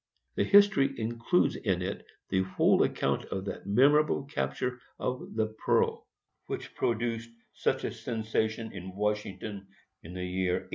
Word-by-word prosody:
The - - +1
history 200 - +5
includes 115 +10 +1
in 90 -4 -1
it 95 +2 -4 0.3
the 95 0 +2
whole 95 0 +3
account - - +1
of 95 0 -4
that 100 - -6
memorable 140 +8 +4
capture 125 - -2 0.2
of 125 -3 -3
the 110 -1 -1
Pearl, - - +2 0.4
which - - -5
produced 115 0 -1 0.2
such - - 0
a - - -1
sensation 110 -1 -2
in 95 -1 -8
Washington 105 -1 -3 0.3
in 85 +3 -10
the 90 0 -3
year 90 0 0
1848. 90 - -3
110 Hz, 145 wpm, -30 LUFS, 95-125 Hz, 0.4 s, history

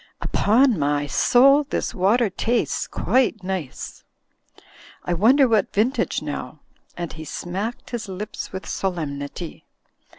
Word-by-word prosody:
Upon 235 - +3
my 145 0 +1
soul, 275 - +5
this - - -2
water 205 +4 +2
tastes 235 +5 0
quite 240 -5 +1
nice. 185 -7 -5 1.0
I 175 - 0
wonder 255 - +5
what 220 -4 +1
vintage 235 +7 +1
now?" - - -5 0.4
and 175 -1 -4
he 155 - -8
smacked 190 +9 -5
his 235 -4 -4
lips 195 +3 -6
with 190 0 -6
solemnity. 160 -3 -4
195 Hz, 120 wpm, -23 LUFS, 175-240 Hz, 1.0 s, soul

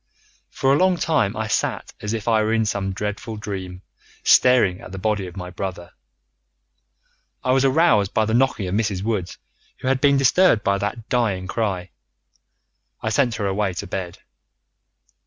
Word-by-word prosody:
"For 135 0 +1
a - - +4
long 185 +1 +3
time 150 - 0
I 110 - -1
sat 110 - -2
as 105 - -3
if 110 -1 -4
I 110 -2 +3
were 110 +1 0
in 110 -1 +2
some 100 -2 -2
dreadful 105 +3 -4
dream, 95 -3 -6 0.4
staring 120 -8 +4
at - - -10
the 95 - -7
body 100 -1 -1
of 90 - -11
my 90 -1 -6
brother. 90 -1 -6 1.5
I 130 - +1
was 130 0 +3
aroused 135 - +3
by 110 - +1
the 110 - -2
knocking 120 -5 +1
of 90 - -3
Mrs. 100 -3 -1
Woods, 105 -5 -2 0.4
who - - -6
had 130 0 +1
been 140 -1 +4
disturbed 135 - +4
by 100 0 +1
that 110 +3 -4
dying 105 -7 0
cry. 95 -3 -2 1.1
I - - 0
sent 125 -5 +2
her 105 - -3
away 95 -1 -1
to 100 - -4
bed. 90 -2 -5
105 Hz, 175 wpm, -22 LUFS, 95-120 Hz, 1.5 s, a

